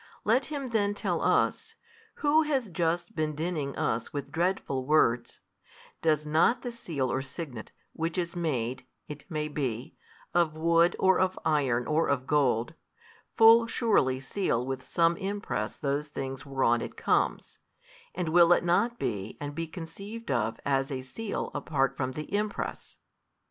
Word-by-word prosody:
Let 240 +5 +3
him 280 -4 -4
then 205 -3 +1
tell - - -1
us, - - +1 0.4
who 300 +1 +3
has 275 -8 0
just 170 0 -1
been 155 -1 -1
dinning 155 -3 -2
us 115 +1 -1
with 140 -1 -5
dreadful 165 -5 -1
words, 125 -4 +2 0.6
Does 155 -2 +2
not 160 +11 +3
the 245 - -3
seal 155 - -3
or 130 - 0
signet, 135 -4 -7 0.2
which 165 +1 -3
is 170 -1 -2
made 130 -7 -2 0.2
(it 150 +4 -9
may 155 -3 -2
be) 130 -5 -3 0.4
of 165 -3 +2
wood 170 +2 +3
or 190 -1 +4
of 185 0 +1
iron 130 -6 +2
or 155 +2 +1
of 130 -2 0
gold, 135 -2 +1 0.6
full 230 +1 +7
surely 200 - +2
seal 135 -4 -1
with 130 0 -3
|350 - - -20
some 170 0 +2
impress 200 +1 -3
those 145 0 -1
things 135 -2 -6
whereon 130 -4 +2
it - - -7
comes, - - 0 0.6
and 175 -3 -2
will 170 +1 +6
it - - +1
not 205 +8 +2
be 100 - -3
and 145 0 -5
be 165 +2 -3
conceived 195 +6 -7
of 115 -3 0
as 135 0 +1
a 130 -1 -3
seal 205 - -4
apart 135 -3 0
from 130 -1 -2
the 150 +6 -7
impress? 210 0 -3
155 Hz, 160 wpm, -28 LUFS, 135-185 Hz, 0.6 s, full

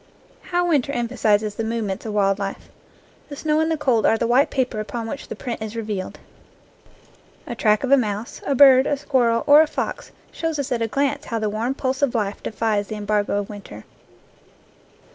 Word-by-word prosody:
How 355 -1 -1
winter 285 -5 +1
emphasizes 220 -4 0
the 225 - -4
movements 220 -3 -3
of 215 - -4
wild 195 -1 +2
life! 195 -1 -5 0.6
The 285 - -7
snow 305 +1 0
and 320 0 +1
the 320 - 0
cold 255 -7 +1
are 225 - +3
the 235 - -1
white 250 +5 +3
paper 255 -5 -1
upon 225 +2 -4
which 275 +5 -6
the - - -6
print 240 -3 -5
is 220 0 -5
revealed. 210 -4 -4 1.3
A 240 - -5
track 215 -1 +2
of 265 - -1
a 275 - +7
mouse, 215 -2 -3
a 280 - +1
bird, 265 -1 +7
a 290 - 0
squirrel, 245 -5 +1
or 290 +2 +8
a 315 - +2
fox - - -4 0.2
shows 325 -2 -3
us 280 -3 -3
at 240 -2 0
a 225 - +1
glance 280 +4 -1
how 230 - -3
the 215 -2 -1
warm 230 +5 -2
pulse 265 0 -2
of 275 -4 +1
life 205 -3 -2
defies 215 -2 -1
the 215 - -5
embargo 205 -1 -1
of 200 - -9
winter. 195 - -10
230 Hz, 200 wpm, -22 LUFS, 215-275 Hz, 1.3 s, or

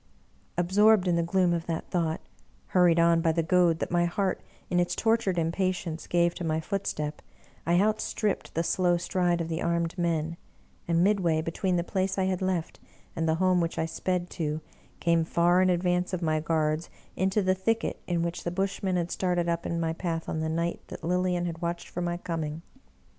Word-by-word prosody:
" - - -34 0.2
Absorbed 195 +3 +4
in 175 - +3
the 170 - +2
gloom 175 +1 +2
of 170 -1 -3
that 165 -1 -4
thought, 165 -3 0 0.5
hurried 175 -2 +4
on 170 0 +4
by 165 - +3
the 165 +1 0
goad 175 -1 +3
that - - -4
my 175 0 +3
heart, 185 +2 -1 0.3
in 175 - +1
its 175 - +1
tor 225 0 +3
tured 195 -6 -2
impatience, 170 0 -1
gave 170 0 +2
to - - -6
my 160 -1 0
footstep, 155 -5 -3 0.5
I 175 +1 +4
outstripped 210 0 0
the 165 - +1
slow 175 0 +2
stride 175 -1 0
of 165 - -3
the 165 0 -3
armed 170 -1 0
men, 165 -1 0 0.5
and, 170 0 +3
midway 185 -6 +2
between 180 +3 -1
the 170 - +1
place 190 +1 -1
I 190 - +2
had 185 -1 -1
left 185 -3 -2 0.4
and 165 0 0
the 160 - +3
home 185 0 +3
which 165 0 -2
I 160 - +1
sped 180 +2 -2
to, 155 -3 -2 0.4
came, 170 -1 +2
far 175 +2 +3
in 185 - +4
advance 180 +1 +1
of 180 -1 -2
my 155 -1 +1
guards, 155 0 0 0.3
into 190 +2 +1
the 185 0 +3
thicket 220 +4 -1
in 170 -2 0
which 170 +1 -3
the - - -1
Bushmen 190 +1 -1
had 175 -1 -1
started 175 -2 0
up 170 0 -1
in 170 - -2
my 165 -1 0
path 165 -1 -3
on 160 - -2
the 160 0 -1
night 170 +2 -1
that - - -9
Lilian 180 +1 0
had 165 -1 -5
watched 170 0 -3
for 175 - -4
my 175 0 -1
coming. 165 -3 -4
175 Hz, 205 wpm, -28 LUFS, 165-185 Hz, 0.5 s, Absorbed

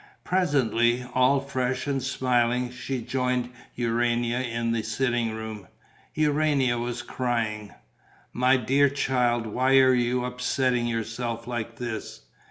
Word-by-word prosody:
Presently, 125 - +1
all 130 +2 +4
fresh 130 -2 -2
and 140 -2 -1
smiling, 125 -1 +1
she 125 0 -4
joined 125 -1 -1 0.2
Urania 120 0 0
in 115 -2 -2
the 115 -1 0
sitting 120 +1 0
room. 110 -3 -7 0.5
Urania 145 -5 +2
was 120 0 -3
crying. 115 -4 -2 0.6
"My 130 +2 +3
dear 135 +4 +3
child, 125 -4 0
why 130 +5 +2
are 130 -1 +6
you 125 0 +1
upsetting 125 -1 0
yourself 115 0 -3
like 120 -1 -4
this? 120 -3 -6
125 Hz, 120 wpm, -26 LUFS, 115-130 Hz, 0.6 s, are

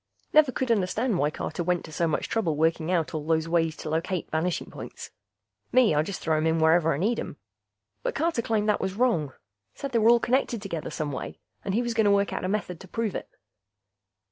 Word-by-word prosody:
Never 300 -3 +6
could 255 -1 -1
understand 215 +1 +1
why 145 - +2
Carter 155 +2 -4
went 180 0 0
to - - -11
so 165 +2 0
much 155 - -1
trouble 190 -9 0
working 160 +1 +1
out 170 -4 0
all 155 -2 -3
those 160 +1 +1
ways 165 -1 +1
to 155 - -6
locate 165 +2 -2
vanishing 165 +2 -1
points. - - -9 0.6
Me, 250 -8 +5
I 150 - +3
just 180 +4 -5
throw 160 -1 +1
'em 155 +1 +1
in 160 0 +2
wherever 160 +1 +4
I 140 - 0
need 215 +9 +1
'em. - - -6 0.6
But - - -2
Carter 325 -6 +1
claimed 220 -2 0
that 210 - +2
was 190 0 -2
wrong. 200 - +1 0.4
Said 275 - -5
they 235 - +2
were 220 +1 +5
all 240 0 +6
connected 245 -1 +1
together 180 -6 -5
some 150 -1 -3
way, 130 - -6 0.3
and 195 - -2
he 240 - +2
was 240 -1 -2
gonna 220 -2 +3
work 200 0 +2
out - - -3
a - - 0
method 190 -4 -2
to 190 - -12
prove 225 +1 -2
it. - - -5
180 Hz, 225 wpm, -26 LUFS, 160-230 Hz, 0.6 s, Never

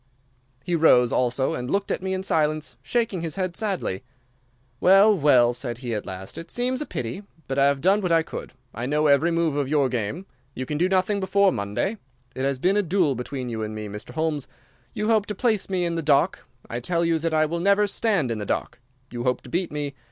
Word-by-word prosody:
"He 175 - -3
rose 125 -7 +5
also 130 +1 +1
and 125 0 -4
looked 200 0 0
at - - -1
me 190 0 -2
in 185 - -4
silence, 155 -3 0
shaking 230 -7 -1
his 165 -2 -3
head 185 -2 -2
sadly. 190 - -2 0.8
"'Well, 195 +3 +6
well,' 130 -7 +4
said 120 -1 -4
he, 120 -2 -4
at 105 - -4
last. 95 0 -7
'It 165 0 -10
seems 255 +2 -1
a 300 - -4
pity, 120 - -4 0.3
but 135 +1 -1
I 140 - +5
have 140 -1 +1
done 195 +5 +3
what 180 -3 -1
I 165 -1 +4
could. - - -8 0.2
I 120 +3 -4
know 150 +2 +1
every 145 +3 +4
move 165 -3 +1
of 145 -2 -1
your 145 -3 +2
game. 125 - -3 0.3
You 130 - -4
can 150 +2 -3
do 180 +2 +2
nothing 190 +2 +1
before 200 0 +3
Monday. 105 - -2 0.3
It 130 - -2
has 140 -1 0
been 185 +9 +2
a - - +4
duel 175 -5 +1
between 125 +1 -5
you 115 -2 -4
and 110 0 -4
me, 105 0 -5
Mr. 105 +1 -8
Holmes. 155 -3 -1 0.5
You 210 - -2
hope 215 -2 +3
to 210 - -4
place 220 -2 0
me 185 -2 0
in 170 - -1
the 165 - -1
dock. 150 +4 +2 0.2
I 120 - -4
tell 170 +7 0
you 165 -1 +2
that 165 0 -1
I 155 0 +4
will 170 +2 -3
never 200 +3 +3
stand 200 - 0
in 110 - -2
the - - -3
dock. - - -2 0.3
You 120 0 -4
hope 125 -1 +1
to - - -12
beat 175 +1 -1
me. 145 -1 -3
155 Hz, 235 wpm, -24 LUFS, 130-190 Hz, 0.8 s, Well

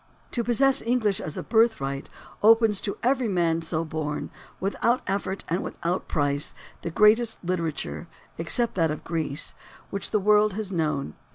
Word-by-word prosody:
To 235 - -1
possess 270 +3 +3
English 225 -5 +1
as 155 - -5
a - - -3
birthright 220 - +1 0.3
opens 225 -1 +5
to 200 - -3
every 255 0 +2
man 170 -3 +1
so 165 0 -1
born, 155 -2 -4 0.3
without 230 +6 +1
effort 195 -1 -2
and 175 +3 0
without 175 +2 -3
price, 145 0 0 0.3
the - - -3
greatest 215 +3 +3
literature, 170 -1 -3 0.3
except 235 +8 +1
that 165 -3 +2
of 150 - -4
Greece, 160 -2 -1 0.4
which 200 - -3
the 210 - +2
world 210 +1 +4
has 205 -1 -4
known. 150 - -1
190 Hz, 155 wpm, -26 LUFS, 160-225 Hz, 0.4 s, opens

